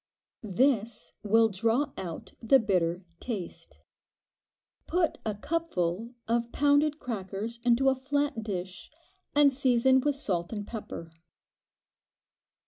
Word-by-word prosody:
This 225 Hz, +1 st, 0 dB
will 225 Hz, +2 st, +4 dB
draw 225 Hz, +8 st, 0 dB
out 170 Hz, -4 st, -7 dB
the 240 Hz, +4 st, +6 dB
bitter 180 Hz, -5 st, 0 dB
taste. 210 Hz, -8 st, -6 dB, 1.1 s
Put 340 Hz, -1 st, 0 dB
a 215 Hz, -2 st, -2 dB
cupful 230 Hz, -, -2 dB
of 235 Hz, +1 st, 0 dB
pounded 290 Hz, +1 st, +3 dB
crackers 215 Hz, -1 st, -5 dB
into 245 Hz, +2 st, +3 dB
a 270 Hz, -, +6 dB
flat 280 Hz, -1 st, -1 dB
dish 185 Hz, -4 st, -5 dB, 0.5 s
and 290 Hz, -1 st, +6 dB
season 260 Hz, 0 st, +4 dB
with 290 Hz, +1 st, +1 dB
salt 180 Hz, -, -2 dB
and 205 Hz, -2 st, -4 dB
pepper. 205 Hz, -7 st, -7 dB
230 Hz, 110 wpm, -29 LUFS, 200-270 Hz, 1.1 s, the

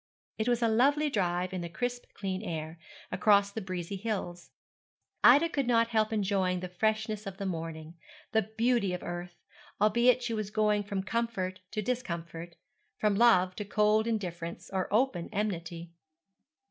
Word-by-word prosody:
It 220 Hz, +3 st, +1 dB
was 240 Hz, -1 st, +1 dB
a -, -, +4 dB
lovely 285 Hz, +7 st, +3 dB
drive 180 Hz, -3 st, 0 dB
in 185 Hz, -, -3 dB
the 170 Hz, -, -5 dB
crisp 245 Hz, +7 st, -3 dB
clear 190 Hz, -2 st, -3 dB
air, 165 Hz, -4 st, -5 dB, 0.3 s
across 200 Hz, +1 st, +4 dB
the 220 Hz, -, -4 dB
breezy 185 Hz, 0 st, -4 dB
hills. 185 Hz, -5 st, -4 dB, 0.7 s
Ida 285 Hz, +7 st, +7 dB
could 280 Hz, -6 st, -1 dB
not 230 Hz, -1 st, +3 dB
help 220 Hz, -1 st, +1 dB
enjoying 195 Hz, -4 st, +1 dB
the 185 Hz, -, -4 dB
freshness 215 Hz, +2 st, -1 dB
of 195 Hz, +1 st, -7 dB
morning, 165 Hz, -4 st, -4 dB, 0.4 s
the 220 Hz, -, +3 dB
beauty 220 Hz, -2 st, +1 dB
of 180 Hz, -, -8 dB
earth, 175 Hz, 0 st, -6 dB, 0.4 s
albeit 235 Hz, +4 st, +4 dB
she 235 Hz, -1 st, -2 dB
was 215 Hz, -2 st, -2 dB
going 210 Hz, -1 st, +2 dB
from 200 Hz, -1 st, -3 dB
comfort 210 Hz, -5 st, -2 dB
to 215 Hz, 0 st, -3 dB
discomfort, 170 Hz, -8 st, -4 dB, 0.4 s
from 210 Hz, -1 st, +2 dB
love 190 Hz, -4 st, +4 dB
to 210 Hz, -, -3 dB
cold 210 Hz, +2 st, +2 dB
indifference 175 Hz, -7 st, -4 dB
or 190 Hz, -1 st, -1 dB
open 215 Hz, -6 st, +1 dB
enmity. 170 Hz, -5 st, -3 dB
205 Hz, 155 wpm, -30 LUFS, 180-225 Hz, 0.7 s, Ida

